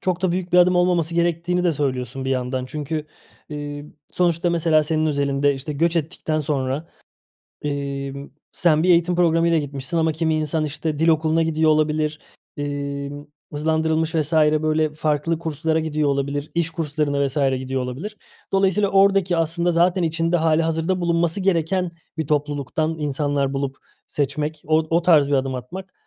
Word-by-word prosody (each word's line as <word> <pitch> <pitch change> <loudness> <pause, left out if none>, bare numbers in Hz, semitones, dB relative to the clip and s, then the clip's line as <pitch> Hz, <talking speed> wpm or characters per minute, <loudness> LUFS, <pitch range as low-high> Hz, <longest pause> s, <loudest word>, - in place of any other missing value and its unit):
çok 185 0 -1
da 185 - +2
büyük 180 0 -3
bir 180 - +6
adım 180 0 +5
olmaması 175 -2 +2
gerektiğini 170 +1 0
de 175 - +3
söylüyorsun 130 -2 -3
bir 135 - -2
yandan. 130 0 -2
Çünkü, 150 +2 -4 0.4
ııı, 145 -1 -6 0.3
sonuçta 175 0 +1
mesela 165 -2 +3
senin 155 +1 0
özelinde, 140 -1 +1
işte, 135 +3 -5
göç 165 +4 +1
ettikten 155 -1 -2
sonra, 140 +1 -2 0.7
emm, 140 -1 -4 0.2
sen 160 -3 +2
bir 185 - +2
eğitim 175 0 +4
programıyla 170 -1 +3
gitmişsin 145 +3 -4
ama 160 0 +2
kimi 160 0 0
insan, 155 0 -1
işte, 150 +1 -3
dil 165 - +2
okuluna 160 0 +3
gidiyor 160 -1 +2
olabilir, 155 0 +1 0.4
emm, 145 0 -4 0.3
hızlandırılmış 160 +1 0
vs. 155 0 0
böyle 155 0 +2
farklı 155 +1 -1
kurslara 160 0 -1
gidiyor 155 -2 0
olabilir, 140 +1 -2
iş 170 -1 +1
kurslarına 150 -3 -1
vs. 135 - -6 0.2
gidiyor 130 0 -3
olabilir. 150 - -6 0.3
Dolayısıyla 195 +1 +2
oradaki 195 -2 +3
aslında 165 +2 +1
zaten 175 +2 +2
içinde 165 +1 +1
hâlihazırda 165 +2 +1
bulunması 170 +1 +1
gereken 180 -1 0 0.3
bir 160 -3 -2
topluluktan 150 +2 -1
insanlar 145 -1 -1
bulup 135 -1 -2 0.3
seçmek, 150 +2 -2
o 155 0 +4
o 170 +1 +3
tarz 155 -5 +5
bir 145 - -1
adım 135 -1 0
atmak, 185 +10 -8
155 Hz, 155 wpm, -22 LUFS, 145-170 Hz, 0.7 s, bir